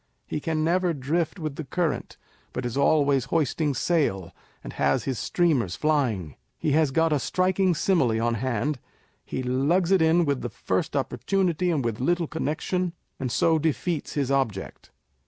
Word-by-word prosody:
He - - -3
can 155 0 -1
never 175 +1 +1
drift 160 +7 -1
with 155 -5 -5
the 160 - -4
current, 160 +1 -2 0.4
but 125 - -3
is 120 - -3
always 140 -2 +3
hoisting 150 0 0
sail, 125 - 0 0.3
and - - -7
has 70 -1 +1
his 130 -4 -2
streamers 140 - +1
flying. 115 - 0 0.2
He 155 - -1
has 155 0 +3
got 160 +3 +2
a 145 - +2
striking 185 +4 +1
simile 135 - +2
on 120 +1 +1
hand; 130 +4 -1 0.4
he 130 - -4
lugs 145 +9 +1
it 190 -3 +5
in 165 +2 +4
with 140 -3 0
the 120 - -3
first 95 -3 -2
opportunity, 175 - 0
and 150 -7 0
with 115 -2 -2
little 170 +6 +1
connexion, 165 +4 -2 0.3
and 130 -2 -2
so 160 +5 +3
defeats 160 +1 -1
his 140 -2 -1
object. 125 -8 -2
150 Hz, 165 wpm, -25 LUFS, 125-170 Hz, 0.4 s, it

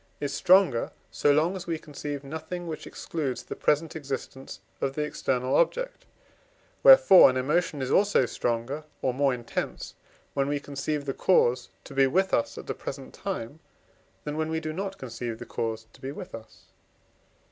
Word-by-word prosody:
is 145 -1 -3
stronger, 175 -5 +4 0.2
so 145 - +3
long 160 +6 +2
as 180 -2 -7
we 165 -1 -1
conceive 145 -2 -6
nothing 160 +5 -6
which 160 -2 -6
excludes 145 -6 -4
the - - -7
present 150 +2 +1
existence 135 -2 -6 0.2
of 135 0 -1
the 150 - 0
external 130 -3 -1
object; - - 0 0.7
wherefore - - +9
an 130 - -1
emotion 150 +1 0
is 130 - -3
also 200 -9 +4
stronger 120 +6 -2 0.2
or 130 - +1
more 140 +1 +2
intense, 120 -2 -4 0.4
when 140 -1 0
we 145 0 0
conceive 145 +1 -3
the 135 - -2
cause 125 -9 +2
to - - -11
be 135 0 +4
with 190 +7 +1
us 115 - +1
at - - -7
the - - -3
present - - -7
time, 120 +8 -5 0.6
than 150 0 -4
when 160 0 -1
we 160 0 -1
do 155 -1 -4
not 195 +3 -4
conceive 120 -4 -5
the - - -8
cause 110 -1 -3
to - - -19
be 135 0 -4
with - - -9
us. 115 -1 -11
145 Hz, 175 wpm, -27 LUFS, 130-160 Hz, 0.7 s, wherefore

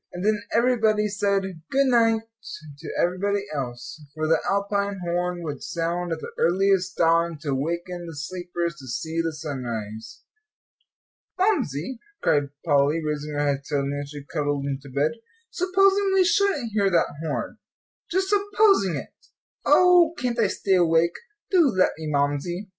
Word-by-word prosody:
And 180 +2 -4
then 215 -1 +2
everybody 225 -3 +2
said 200 -1 0 0.3
"good 275 +1 +3
night" 230 -3 +3 0.6
to - - -8
everybody 195 +3 0
else; 125 +2 -6
for 155 0 -2
the 160 0 +3
Alpine 200 0 0
horn 175 0 -2
would 145 -4 -5
sound 170 +1 -2
at 165 - -2
the - - -7
earliest 185 +1 +2
dawn 165 0 +2
to 145 -4 -2
waken 170 +5 -3
the 165 - -8
sleepers 170 +2 -4
to 135 - -11
see 160 +7 -2
the 165 0 -1
sunrise. 120 -8 -6 1.1
"Mamsie," 260 - 0 0.2
cried 145 -1 +1 0.2
Polly, 145 0 +3
raising 150 0 -3
her 145 0 0
head 140 -1 0
suddenly 140 0 -2
as 145 - -8
she 145 -1 -8
cuddled 145 -1 -2
into 140 0 -4
bed, 140 +3 +1 0.4
"supposing 390 +2 +3
we 380 - +5
shouldn't 350 - +1
hear 200 -2 +2
that 170 -3 +1
horn 155 -3 -4 0.5
just 380 +2 0
supposing 405 - +3
it! 140 - -7 0.5
Oh, 355 -2 +5
can't 240 -1 -2
I 220 - +4
stay 195 0 -1
awake? 170 0 +3 0.4
Do 350 -5 +5
let 185 -7 +3
me, 160 - -5
Mamsie." 145 +7 -1
175 Hz, 150 wpm, -24 LUFS, 145-215 Hz, 1.1 s, we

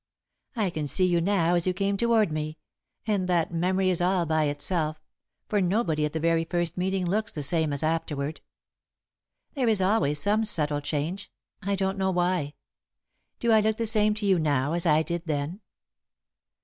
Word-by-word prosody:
I 210 -6 0
can 155 -3 -3
see 185 +7 +3
you 175 -2 +2
now 175 -2 +1
as 175 0 +1
you 185 - 0
came 200 +1 0
toward 225 -3 +2
me, 155 0 -4 0.5
and 200 -4 -1
that 175 -1 +1
memory 185 +2 +1
is 180 - +1
all 180 -1 +2
by 155 -1 +1
itself, 155 +2 -1 0.5
for 205 -2 +1
nobody 175 -5 +1
at 150 - -4
the 160 - -2
very 165 0 +2
first 175 0 -1
meeting 185 0 -1
looks 205 +4 0
the 150 - -5
same 160 +1 +1
as 140 +1 -2
afterward. 155 -2 -2 1.1
There 265 -5 -1
is 215 -3 +3
always 185 -7 +2
some 210 +6 +1
subtle 150 -8 +1
change 155 +7 -4 0.3
I 200 0 -1
don't 190 0 -2
know 190 0 +1
why. 175 -5 0 0.8
Do 235 - +1
I 220 - +6
look 215 0 +1
the 230 - -2
same 215 -1 +2
to 210 -1 -3
you 190 -3 +3
now 145 -1 0
as 170 0 +1
I 155 0 +4
did 170 +1 -4
then?" 155 +6 -3
175 Hz, 185 wpm, -26 LUFS, 155-200 Hz, 1.1 s, I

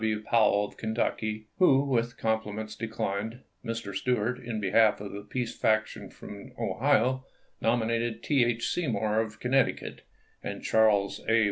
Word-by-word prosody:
W. 110 -1 0
Powell 105 -3 +3
of - - -12
Kentucky, 110 -1 -2
who 140 -7 +5
with 120 -3 0
compliments 110 -1 -2
declined; 110 +1 -3 0.2
Mr. 115 -4 -4
Stuart, 125 +3 0
in 120 -3 -4
behalf 105 +2 +4
of 100 -1 -7
the 100 - -6
peace 120 +3 -4
faction 110 -1 0
from 100 -1 -11
Ohio, 130 +3 +2 0.4
nominated 115 0 0
T. 140 -4 +3
H. 120 -1 0
Seymour 110 - 0
of 110 -1 -3
Connecticut; 130 +1 0 0.4
and - - -6
Charles 105 -3 +3
A. 115 0 +5
110 Hz, 140 wpm, -28 LUFS, 105-120 Hz, 0.4 s, who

